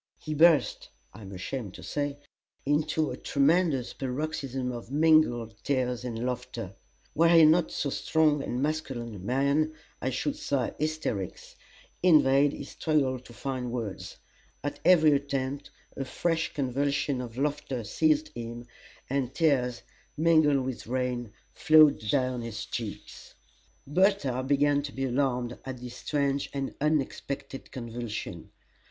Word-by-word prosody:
He 155 Hz, -, -5 dB
burst 160 Hz, 0 st, +4 dB, 0.2 s
I 110 Hz, -, -12 dB
am 100 Hz, -1 st, -9 dB
ashamed 100 Hz, +2 st, -5 dB
to -, -, -10 dB
say 145 Hz, -1 st, -2 dB, 0.5 s
into 150 Hz, +2 st, +1 dB
a -, -, -5 dB
tremendous 145 Hz, -2 st, +2 dB
paroxysm 135 Hz, -1 st, -3 dB
of 120 Hz, -1 st, -7 dB
mingled 145 Hz, -7 st, +3 dB
tears 125 Hz, -3 st, 0 dB
and 120 Hz, -1 st, -4 dB
laughter: 120 Hz, -5 st, -4 dB, 0.4 s
were 165 Hz, +2 st, +4 dB
he 165 Hz, -2 st, +8 dB
not 160 Hz, +2 st, +4 dB
so 140 Hz, -, -2 dB
strong 155 Hz, -1 st, +2 dB
and 125 Hz, 0 st, -2 dB
masculine 135 Hz, -7 st, -3 dB
a 100 Hz, -, -8 dB
man, 140 Hz, +8 st, +1 dB, 0.3 s
I 130 Hz, -, 0 dB
should 275 Hz, -, -2 dB
say, 140 Hz, -, -1 dB
"hysterics." 155 Hz, -, -3 dB, 0.5 s
In 170 Hz, -4 st, +6 dB
vain 135 Hz, +2 st, +4 dB
he -, -, -6 dB
struggled 135 Hz, -5 st, -1 dB
to 120 Hz, -, -13 dB
find 130 Hz, -1 st, -4 dB
words. 115 Hz, -5 st, -5 dB, 0.5 s
At 145 Hz, -, -4 dB
every 160 Hz, -3 st, +6 dB
attempt 140 Hz, -1 st, -1 dB, 0.3 s
a 135 Hz, -, -3 dB
fresh 165 Hz, +5 st, -1 dB
convulsion 140 Hz, 0 st, 0 dB
of 120 Hz, -1 st, -8 dB
laughter 140 Hz, -3 st, -2 dB
seized 310 Hz, -, +1 dB
him, 120 Hz, 0 st, -7 dB, 0.4 s
and 135 Hz, -2 st, -2 dB
tears, 130 Hz, -7 st, +1 dB, 0.3 s
mingled 155 Hz, -4 st, +4 dB
with 130 Hz, -4 st, -5 dB
rain, 125 Hz, -2 st, -2 dB, 0.2 s
flowed 155 Hz, -2 st, +6 dB
down 130 Hz, +2 st, +1 dB
his 115 Hz, -2 st, -5 dB
cheeks. -, -, -7 dB, 0.5 s
Bertha 150 Hz, -5 st, +2 dB
began 145 Hz, +2 st, +2 dB
to 140 Hz, 0 st, -6 dB
be 135 Hz, 0 st, -3 dB
alarmed 125 Hz, -2 st, -1 dB
at 130 Hz, -1 st, -6 dB
this 125 Hz, 0 st, -9 dB
strange 140 Hz, -1 st, -1 dB
and 135 Hz, -1 st, -3 dB
unexpected 140 Hz, -2 st, -2 dB
convulsion. 120 Hz, -3 st, -6 dB
135 Hz, 135 wpm, -28 LUFS, 125-150 Hz, 0.5 s, he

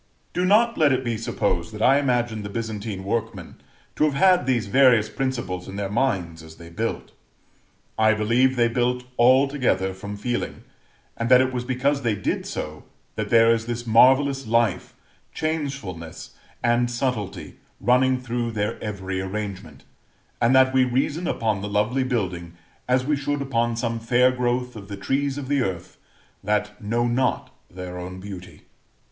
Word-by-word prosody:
Do 180 Hz, -, 0 dB
not 230 Hz, +5 st, +3 dB
let 150 Hz, -3 st, +5 dB
it 130 Hz, 0 st, +1 dB
be 120 Hz, -2 st, -1 dB
supposed 100 Hz, -6 st, -2 dB
that 105 Hz, -, -7 dB
I 135 Hz, +2 st, +5 dB
imagine 120 Hz, -5 st, 0 dB
the 100 Hz, -, -6 dB
Byzantine 105 Hz, -3 st, -5 dB
workmen 105 Hz, -3 st, -4 dB, 0.3 s
to -, -, +1 dB
have 145 Hz, -2 st, 0 dB
had 180 Hz, +2 st, +4 dB
these 120 Hz, -4 st, +1 dB
various 120 Hz, -1 st, +4 dB
principles 120 Hz, -8 st, -3 dB
in 95 Hz, -, -8 dB
their 100 Hz, -1 st, -3 dB
minds 95 Hz, -9 st, -1 dB
as 80 Hz, 0 st, -13 dB
they 85 Hz, 0 st, -13 dB
built. 110 Hz, +6 st, -4 dB, 0.9 s
I 110 Hz, 0 st, +4 dB
believe 120 Hz, +5 st, +2 dB
they 120 Hz, -1 st, +3 dB
built 125 Hz, +1 st, 0 dB, 0.2 s
altogether 130 Hz, -6 st, +3 dB
from 100 Hz, +2 st, -7 dB
feeling, 120 Hz, +4 st, -3 dB, 0.5 s
and 115 Hz, 0 st, -3 dB
that 125 Hz, 0 st, +8 dB
it 130 Hz, 0 st, +1 dB
was 125 Hz, -1 st, -3 dB
because 135 Hz, +3 st, 0 dB
they 115 Hz, -4 st, 0 dB
did 100 Hz, -, -2 dB
so, 75 Hz, 0 st, -6 dB, 0.3 s
that 105 Hz, -1 st, -3 dB
there 115 Hz, 0 st, +6 dB
is 115 Hz, 0 st, -3 dB
this 120 Hz, 0 st, -4 dB
marvellous 135 Hz, +4 st, +4 dB
life, 110 Hz, -5 st, 0 dB, 0.4 s
changefulness, 135 Hz, -, -4 dB, 0.3 s
and 120 Hz, +1 st, +2 dB
subtlety 120 Hz, -5 st, -3 dB, 0.2 s
running 130 Hz, +1 st, +3 dB
through 120 Hz, -1 st, -3 dB
their 105 Hz, -1 st, -3 dB
every 95 Hz, -3 st, -4 dB
arrangement; 95 Hz, -6 st, -6 dB, 0.6 s
and 120 Hz, +2 st, +4 dB
that 130 Hz, 0 st, +5 dB
we 130 Hz, -1 st, +4 dB
reason 140 Hz, +7 st, -1 dB
upon 110 Hz, -3 st, -1 dB
the 105 Hz, -, -4 dB
lovely 105 Hz, +6 st, +1 dB
building 90 Hz, -9 st, -3 dB, 0.3 s
as 125 Hz, 0 st, +2 dB
we 150 Hz, +1 st, +1 dB
should 145 Hz, +1 st, -2 dB
upon 120 Hz, -3 st, 0 dB
some 115 Hz, -1 st, -2 dB
fair 125 Hz, +3 st, +3 dB
growth 125 Hz, 0 st, -1 dB
of 100 Hz, -3 st, -9 dB
the 100 Hz, 0 st, -7 dB
trees 135 Hz, +7 st, -1 dB
of 140 Hz, -2 st, -5 dB
the 140 Hz, -1 st, +1 dB
earth, 90 Hz, -5 st, -4 dB, 0.4 s
that 105 Hz, +1 st, -1 dB
know 115 Hz, +3 st, 0 dB
not 120 Hz, +1 st, 0 dB, 0.2 s
their 90 Hz, 0 st, -7 dB
own 90 Hz, +1 st, -7 dB
beauty. 95 Hz, -2 st, -10 dB
115 Hz, 165 wpm, -23 LUFS, 100-130 Hz, 0.9 s, that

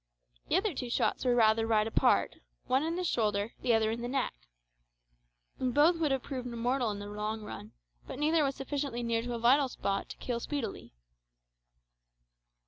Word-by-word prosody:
The -, -, +1 dB
other 405 Hz, -1 st, +1 dB
two 250 Hz, -3 st, -4 dB
shots -, -, 0 dB
were 245 Hz, -1 st, +3 dB
rather 225 Hz, -1 st, +4 dB
wide 215 Hz, -1 st, +3 dB
apart 225 Hz, -, +2 dB, 0.3 s
one 260 Hz, +2 st, +2 dB
in 325 Hz, +2 st, -1 dB
the 365 Hz, -, -2 dB
shoulder, 215 Hz, -, 0 dB
the 240 Hz, -2 st, +3 dB
other 220 Hz, 0 st, +2 dB
in 230 Hz, +1 st, -4 dB
the 240 Hz, -, -3 dB
neck. 270 Hz, +2 st, -1 dB, 1.3 s
Both 290 Hz, +7 st, +3 dB
would 320 Hz, -2 st, +1 dB
have 270 Hz, -2 st, 0 dB
proved 255 Hz, -3 st, -5 dB
mortal 245 Hz, +1 st, 0 dB
in 205 Hz, -, -3 dB
the 205 Hz, -, -7 dB
long 210 Hz, +1 st, -4 dB
run, 105 Hz, -, -8 dB, 0.3 s
but -, -, -6 dB
neither 310 Hz, +2 st, +3 dB
was 275 Hz, -1 st, 0 dB
sufficiently 275 Hz, -3 st, -3 dB
near 230 Hz, -1 st, 0 dB
to 240 Hz, +1 st, -4 dB
a -, -, -2 dB
vital 260 Hz, +4 st, +4 dB
spot 195 Hz, -4 st, -2 dB
to -, -, -8 dB
kill 240 Hz, -2 st, -3 dB
speedily. 235 Hz, -, -5 dB
245 Hz, 180 wpm, -31 LUFS, 225-275 Hz, 1.3 s, rather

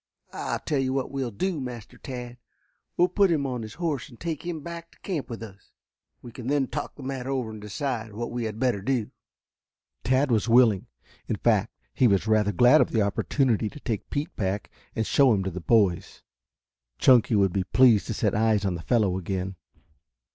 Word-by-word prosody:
I'll -, -, -2 dB
tell 145 Hz, -3 st, -2 dB
you 130 Hz, -1 st, 0 dB
what 135 Hz, -1 st, -2 dB
we 135 Hz, 0 st, -3 dB
will 125 Hz, -, -3 dB
do, 160 Hz, -, -2 dB
Master 120 Hz, -4 st, -8 dB
Tad. 125 Hz, -2 st, -7 dB, 0.6 s
We 175 Hz, -, +4 dB
will -, -, +5 dB
put 195 Hz, +1 st, +3 dB
him 155 Hz, -4 st, +1 dB
on 125 Hz, -3 st, -3 dB
his 110 Hz, 0 st, -8 dB
horse 160 Hz, -7 st, -2 dB
and 120 Hz, -, -16 dB
take 165 Hz, -3 st, -4 dB
him 170 Hz, -3 st, -4 dB
back 170 Hz, +1 st, -8 dB
to -, -, -24 dB
camp 170 Hz, -8 st, -4 dB
with 115 Hz, -1 st, -6 dB
us. 100 Hz, -3 st, -13 dB, 0.5 s
We 120 Hz, -, -9 dB
can 120 Hz, +1 st, -8 dB
then 140 Hz, 0 st, +2 dB
talk 145 Hz, +4 st, -5 dB
the 140 Hz, -, -11 dB
matter 130 Hz, -1 st, -4 dB
over 130 Hz, -5 st, -2 dB
and 110 Hz, -1 st, -9 dB
decide 115 Hz, +1 st, -4 dB
what 120 Hz, +3 st, -4 dB
we 120 Hz, -1 st, -3 dB
had 110 Hz, -1 st, -4 dB
better 120 Hz, -5 st, 0 dB
do." 120 Hz, -1 st, -1 dB, 0.9 s
Tad 130 Hz, +1 st, +2 dB
was 115 Hz, 0 st, +1 dB
willing, 115 Hz, -5 st, +4 dB, 0.4 s
in -, -, -1 dB
fact -, -, +1 dB, 0.2 s
he 130 Hz, -, +4 dB
was 100 Hz, -2 st, +2 dB
rather 110 Hz, -2 st, +2 dB
glad 125 Hz, -, +6 dB
of -, -, +2 dB
the 110 Hz, -3 st, +2 dB
opportunity 110 Hz, +2 st, +1 dB
to 150 Hz, -, -12 dB
take 110 Hz, -6 st, -4 dB
Pete 150 Hz, +5 st, -3 dB
back 100 Hz, -1 st, -2 dB, 0.2 s
and 110 Hz, -, 0 dB
show 135 Hz, +2 st, +4 dB
him 100 Hz, -2 st, 0 dB
to 95 Hz, -, -3 dB
the 90 Hz, +1 st, -6 dB
boys. 100 Hz, -3 st, +1 dB, 0.7 s
Chunky 120 Hz, -3 st, +5 dB
would 95 Hz, -3 st, +3 dB
be 95 Hz, -, 0 dB
pleased 115 Hz, +2 st, +4 dB
to 115 Hz, -, -3 dB
set 105 Hz, -1 st, 0 dB
eyes 110 Hz, -2 st, +2 dB
on 95 Hz, -, 0 dB
the 85 Hz, -, -5 dB
fellow 100 Hz, -3 st, +1 dB
again. 95 Hz, +1 st, -3 dB
120 Hz, 210 wpm, -26 LUFS, 105-135 Hz, 0.9 s, glad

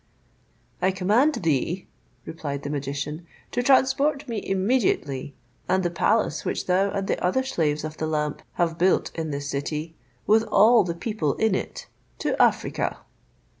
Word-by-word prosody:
"I 185 Hz, -, +3 dB
command 210 Hz, +11 st, +2 dB
thee," 165 Hz, -, -1 dB, 0.4 s
replied 145 Hz, -3 st, -5 dB
the 145 Hz, -, -4 dB
magician, 145 Hz, +3 st, -4 dB, 0.2 s
"to 245 Hz, -, 0 dB
transport 275 Hz, +3 st, +3 dB
me 225 Hz, -4 st, -3 dB
immediately 190 Hz, -, 0 dB, 0.3 s
and 190 Hz, 0 st, +2 dB
the 175 Hz, -, 0 dB
palace 210 Hz, -2 st, +1 dB
which -, -, -2 dB
thou 190 Hz, +2 st, +2 dB
and 195 Hz, -1 st, -2 dB
the -, -, -2 dB
other 185 Hz, +9 st, +2 dB
slaves 155 Hz, -, -1 dB
of 155 Hz, 0 st, -6 dB
the 155 Hz, -, -2 dB
lamp 150 Hz, -1 st, -2 dB
have 170 Hz, -1 st, -1 dB
built 185 Hz, +2 st, +2 dB
in 160 Hz, -1 st, -4 dB
this 140 Hz, -1 st, -4 dB
city, 150 Hz, +3 st, -3 dB, 0.3 s
with 220 Hz, +1 st, +5 dB
all 225 Hz, +3 st, +5 dB
the 170 Hz, -2 st, -3 dB
people 170 Hz, -, -2 dB
in 220 Hz, -2 st, +1 dB
it, -, -, -4 dB, 0.3 s
to -, -, -1 dB
Africa." -, -, +1 dB
180 Hz, 155 wpm, -25 LUFS, 150-215 Hz, 0.4 s, with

